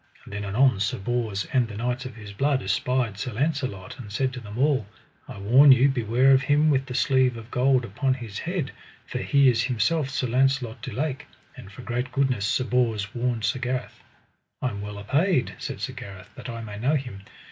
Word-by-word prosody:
And - - -12
then 100 0 -4
anon 110 +2 +3
Sir 105 - 0
Bors 110 -2 -2
and 125 -3 +3
the 105 -2 -8
knights 125 +3 -2
of 125 - -11
his 105 -3 -10
blood 135 +4 +1
espied 115 +1 0
Sir 120 +3 -4
Launcelot, 130 - -2
and 105 -5 -9
said 130 +4 0
to 125 - -6
them 105 -2 -9
all: 135 -5 +2 0.4
I - - -9
warn 125 +9 +6
you 130 +2 +6
beware 125 +1 +3
of 135 0 +6
him 150 +2 +3
with 135 -1 +1
the 125 - -5
sleeve 130 -3 +2
of 115 +1 -11
gold 130 0 +2
upon 130 +5 0
his 115 -6 -7
head, 175 -4 -3 0.3
for - - -4
he 140 -1 +3
is 115 -3 +4
himself 130 +5 +1
Sir 135 -2 -1
Launcelot 130 -1 +1
du - - -6
Lake; 140 0 -3 0.3
and 125 -7 -11
for 115 +6 -11
great 125 +2 -3
goodness 130 -7 +1
Sir 130 - +1
Bors 115 -5 0
warned 120 -2 -1
Sir 130 - 0
Gareth. 125 0 -3 0.6
I 130 - 0
am 100 -3 -6
well 105 0 -6
apaid, 140 - +1
said - - -5
Sir - - -4
Gareth, 95 -2 -10
that - - -9
I 115 -1 -6
may 105 -2 -7
know 135 +7 +2
him. 125 -8 -4
125 Hz, 210 wpm, -25 LUFS, 110-135 Hz, 0.6 s, warn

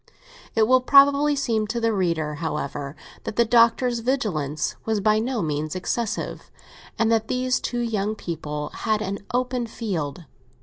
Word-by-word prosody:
It 220 -1 +4
will 255 +1 +5
probably 280 +2 +5
seem 230 -6 0
to 235 +2 -2
the 230 -1 +1
reader, 165 -6 0
however, 145 -2 -3 0.3
that 220 - -5
the 235 - +4
Doctor's 235 +1 +4
vigilance 180 - -1
was 220 -1 0
by 215 +2 +3
no 235 -1 -1
means 150 +1 -2
excessive, 225 +4 -3 0.5
and 225 0 +2
that 220 -1 +2
these 255 0 0
two 240 -1 -2
young 215 -2 -1
people 150 -5 -5
had 215 -2 -1
an 200 0 -3
open 250 -1 -1
field. 175 - -4
220 Hz, 150 wpm, -24 LUFS, 170-240 Hz, 0.5 s, will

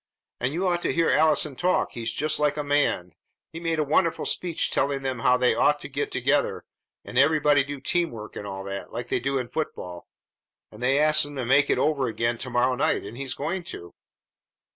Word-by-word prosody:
And 125 +2 -1
you 180 +5 -1
ought 175 -1 +1
to - - 0
hear 165 -1 +2
Allison 155 -2 +2
talk! 180 +6 +1
He's 115 -1 -3
just 150 +6 +1
like 150 0 +1
a 150 - -1
man! 145 - 0 0.4
He 165 - -6
made 165 -1 -1
a 155 - +2
wonderful 160 +3 +1
speech 175 -3 -1
telling 140 -1 0
them 130 -2 -2
how 125 +2 +4
they 125 0 +3
ought 145 0 +2
to - - -7
get 140 +1 -3
together, 135 +3 0 0.4
and 125 - -1
everybody 145 -1 +4
do 145 0 -6
teamwork 130 -8 -2
and 105 - -6
all 95 0 -6
that, 100 0 -6
like 120 +1 -6
they - - +1
do 135 +2 -1
in 125 -2 -3
football; 90 - -5 0.6
and 105 - -13
they 130 +2 +2
asked 155 +1 +5
him 145 0 -6
to 130 -3 -3
make 140 +3 +4
it - - +2
over 140 -4 +1
again 115 +1 -1
to 130 - -4
morrow 125 +1 +2
night, 125 - 0
and 105 +3 -8
he's 135 0 -3
going 175 +6 -3
to!" 85 - -8
140 Hz, 215 wpm, -25 LUFS, 120-155 Hz, 0.6 s, asked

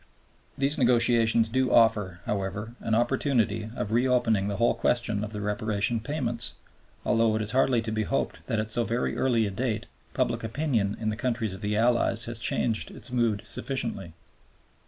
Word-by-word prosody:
These 140 +2 +1
negotiations 115 -2 +4
do 130 +3 0
offer, 105 -6 +3
however, 105 +3 -3
an 110 - 0
opportunity 115 -3 +1
of 105 - -3
reopening 120 -4 +2
the 100 - -2
whole 115 +4 +3
question 110 -4 0
of 105 - -5
the 105 -1 -5
Reparation 105 +2 -1
payments, 120 -3 -2 0.5
although 115 -2 +3
it 110 - 0
is 105 - -1
hardly 125 -2 +2
to 110 - -3
be 110 0 -1
hoped 105 - -2
that 115 - 0
at 110 0 -3
so 120 +2 +1
very 115 +2 -1
early 120 -4 +2
a 100 - -3
date, 115 +1 -2 0.3
public 120 -3 0
opinion 115 -4 -1
in 110 - -1
the 105 - -2
countries 115 -3 -1
of 95 - -9
the 105 0 -1
Allies 115 0 +2
has 115 -1 0
changed 110 0 0
its - - -9
mood 115 -5 +1
sufficiently. 95 -10 -4
115 Hz, 175 wpm, -27 LUFS, 105-120 Hz, 0.5 s, negotiations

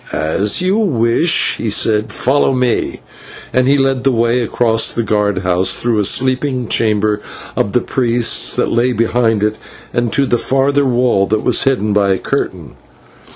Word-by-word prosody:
"As 100 - 0
you 190 +4 +1
wish," 155 - +1
he 115 - -3
said; 105 +1 +1
"follow 135 +1 +1
me." 125 -2 -1 0.5
And 130 0 +2
he 140 +1 +3
led 135 -2 0
the 135 - +2
way 120 +1 +1
across 115 -1 +1
the 115 - -2
guard 105 -2 0
house, 90 0 +1
through 115 -3 -1
a - - +1
sleeping 130 +2 0
chamber 105 -1 0 0.3
of 100 - -1
the 125 - +2
priests 120 -2 +1
that - - -1
lay 120 +2 +1
behind 115 -2 0
it, 105 0 -1 0.5
to 140 - +1
the 120 -2 0
further 140 +2 +1
wall 120 -6 +1
that 110 +1 -1
was - - +1
hidden 110 -6 0
by 100 -1 +2
a - - -1
curtain. - - -4
120 Hz, 165 wpm, -15 LUFS, 105-130 Hz, 0.5 s, he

